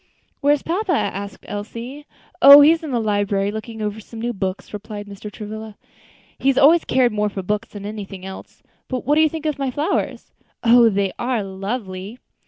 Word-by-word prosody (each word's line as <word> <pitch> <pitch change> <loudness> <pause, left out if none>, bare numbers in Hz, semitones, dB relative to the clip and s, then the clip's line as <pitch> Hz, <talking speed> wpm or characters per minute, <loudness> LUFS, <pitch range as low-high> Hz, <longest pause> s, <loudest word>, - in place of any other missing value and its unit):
"Where 290 0 +4
is 285 - -8
papa?" 370 +3 -1
asked 200 - -3
Elsie. 235 +7 -7 0.3
"Oh! 280 +1 +11
he's 320 +3 +5
in 315 - -6
the 245 -3 0
library, 205 -2 0
looking 220 +1 -6
over 210 +1 -3
some 225 +1 -11
new 240 +1 -2
books," 190 0 -4
replied 210 0 -7
Mr. 205 +1 -9
Travilla. 215 0 -8 0.6
"He 275 - +3
always 320 +6 +5
cared 250 -2 +2
more 210 0 0
for 195 -1 -6
books 210 +4 -2
than 205 -1 -9
anything 200 -3 -7
else. 190 0 -10 0.2
But 255 -2 -4
what 290 - +2
do 310 - +4
you 315 - +4
think 320 0 -7
of 300 -2 -1
my 275 -1 -1
flowers?" 290 +5 -2 0.3
"Oh! 235 0 +6
they 195 -2 -1
are 240 -3 -1
lovely! 195 +1 -5
220 Hz, 190 wpm, -21 LUFS, 205-265 Hz, 0.6 s, Oh